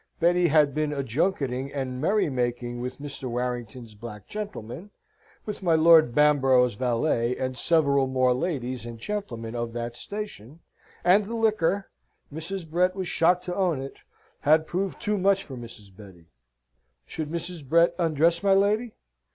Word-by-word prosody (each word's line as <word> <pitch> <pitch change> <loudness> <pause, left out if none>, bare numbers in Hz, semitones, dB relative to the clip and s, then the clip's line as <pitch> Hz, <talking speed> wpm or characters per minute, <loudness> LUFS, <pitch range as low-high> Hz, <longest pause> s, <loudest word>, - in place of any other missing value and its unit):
Betty 175 +1 +3
had 150 -2 +4
been 155 0 -1
a 140 -2 -2
junketing 135 - -1
and 130 -2 -4
merry 200 +5 +2
making 120 -2 -2
with 125 +1 -5
Mr. 140 -2 -7
Warrington's 120 -1 -4
black 105 -1 -10
gentleman, 200 - -7 0.6
with 210 -2 -5
my 170 -3 +3
Lord 160 -6 +6
Bamborough's 135 -4 +4
valet, 120 +1 0
and 130 0 -3
several 140 -2 +2
more 130 -1 +2
ladies 130 -5 -3
and 120 0 -8
gentlemen 115 - -5
of 120 -1 -4
that 120 0 -4
station, 170 - -8 0.4
and 195 +3 +4
the 230 - -4
liquor 205 -4 +1 0.4
Mrs. 165 +3 -5
Brett 180 +3 +1
was 190 -2 -3
shocked 180 +2 +2
to 180 - -3
own 180 -7 +1
it 135 +1 -7 0.4
had 155 +2 +3
proved 185 +3 -3
too 210 -1 -1
much 195 +1 +2
for 135 - -9
Mrs. 115 -5 -11
Betty. 95 -5 -14 0.8
Should 150 - -5
Mrs. 170 0 -5
Brett 170 +5 +3
undress 165 0 +2
my 195 -1 +4
lady? 210 +4 +1
150 Hz, 155 wpm, -26 LUFS, 125-180 Hz, 0.8 s, Lord